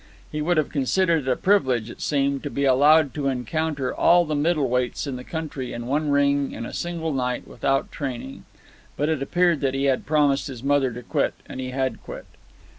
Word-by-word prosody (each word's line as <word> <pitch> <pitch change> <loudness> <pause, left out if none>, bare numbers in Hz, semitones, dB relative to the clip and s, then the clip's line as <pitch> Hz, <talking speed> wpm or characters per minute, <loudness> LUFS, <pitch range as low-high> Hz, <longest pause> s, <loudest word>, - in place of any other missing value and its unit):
He 150 - -3
would 170 +2 +1
have 155 - +1
considered 160 +1 +1
it - - +3
a - - +2
privilege, 130 - +1
it - - -12
seemed, 140 -1 0
to 145 - -4
be 140 0 -1
allowed 145 +2 +5
to 145 -2 -2
encounter 135 +2 -2
all 175 0 +4
the 155 - -3
middle 150 -1 +1
weights 125 +2 -1
in 140 -3 -4
the 125 - -7
country 150 -5 -5
in 120 0 -5
one 145 +4 0
ring 140 0 +2
in 115 - -5
a - - -8
single 165 -2 -3
night 125 -2 -2
without 135 +3 -1
training. 130 -2 -6 0.5
But 150 +3 0
it 155 -4 0
appeared 175 +2 +2
that 135 -1 0
he 135 - -1
had 135 -2 +1
promised 145 -1 +2
his 130 -3 -8
mother 140 -2 +2
to 125 +1 -8
quit, - - 0
and - - -8
he 130 0 -4
had 130 0 -2
quit. - - -9
140 Hz, 210 wpm, -24 LUFS, 130-155 Hz, 0.5 s, allowed